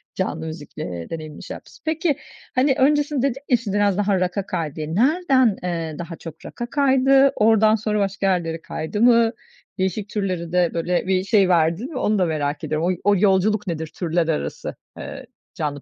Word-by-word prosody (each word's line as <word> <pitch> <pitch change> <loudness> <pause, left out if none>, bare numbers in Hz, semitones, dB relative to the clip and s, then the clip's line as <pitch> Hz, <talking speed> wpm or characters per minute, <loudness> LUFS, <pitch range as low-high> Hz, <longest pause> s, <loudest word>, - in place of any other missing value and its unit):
canlı 160 -4 -2
müzikle 145 - -7
deneyimini 155 -2 -7
şey - - -6
yapmışsın. - - -15
Peki, 315 -2 0 0.4
hani, 265 +1 +3
öncesinde 290 0 +2
dedin 265 +2 -7
ya, 245 - +5
"Şimdi 210 -4 -4
biraz 205 -2 +2
daha 200 -2 +2
rock'a 185 +2 -1
kaydı." 165 -6 -3
diye. 155 +1 -4
Nereden, 260 - +3
eee, 165 -3 -3
daha 170 -1 -6
çok 160 -1 -11
rock'a 240 - -5
kaydı? 270 0 +4
Oradan 220 0 +4
sonra 210 -1 -1
başka 195 0 -1
yerlere 165 -3 0
kaydı 170 +6 -4
mı? 235 -1 +5 0.5
Değişik 190 +2 -2
türlere 185 -5 -3
de 180 -2 +2
böyle 175 +2 -1
bir 185 -1 +2
şey 195 -2 +3
verdin 170 - +2
mi? 285 - -5
Onu 210 -4 +1
da 185 - +3
merak 150 -3 -2
ediyorum. 155 +3 -1
Oy 185 - 0
o 205 0 +4
yolculuk 205 +1 +2
nedir 160 -2 -3
türler 170 -1 0
arası, 160 - -3 0.2
eee, - - -8 0.3
canlı 145 -2 -3
190 Hz, 180 wpm, -22 LUFS, 165-225 Hz, 0.5 s, ya